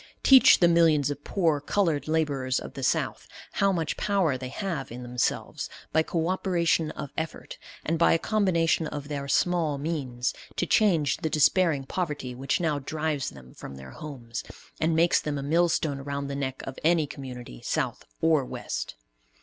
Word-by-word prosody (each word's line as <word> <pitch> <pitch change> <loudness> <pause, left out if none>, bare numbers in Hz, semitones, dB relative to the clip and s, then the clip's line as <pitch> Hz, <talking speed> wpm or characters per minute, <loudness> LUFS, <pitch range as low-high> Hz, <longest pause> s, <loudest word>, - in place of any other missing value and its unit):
Teach 265 -6 +8
the 175 - +7
millions 160 -4 +4
of 145 0 -6
poor 165 -7 +1
colored 165 -3 0
laborers 145 -5 0
of - - -9
the - - -7
South - - 0 0.2
how 200 0 +2
much 165 -4 -2
power 195 -9 +1
they 130 0 -5
have 160 - -4
in 125 +1 -7
themselves, 125 0 -2 0.2
by 160 - +5
co 165 0 -1
operation 170 -4 +1
of 140 - -7
effort, 160 0 -5 0.3
and 165 +1 0
by 170 - +5
a - - +4
combination 170 -5 +1
of 145 -1 -6
their 140 -1 -4
small 165 -1 +1
means, 135 -5 -2 0.2
to - - 0
change 170 -7 +3
the 160 -1 -2
despairing 155 -1 +3
poverty 145 -4 -3
which 135 +2 -1
now 155 -4 0
drives 150 0 -2
them 65 -2 -14
from 70 - -9
their 65 -1 -10
homes, 120 -6 -7 0.4
and 160 +1 +2
makes 165 +1 +4
them 150 -1 -3
a 140 - -4
millstone 160 -2 +1
around 140 0 -4
the 140 - -3
neck 135 -2 -3
of 135 - -7
any 165 -1 +3
community, 125 - -9
South - - -2 0.2
or 160 -4 +4
West. - - -5
150 Hz, 175 wpm, -27 LUFS, 135-170 Hz, 0.4 s, Teach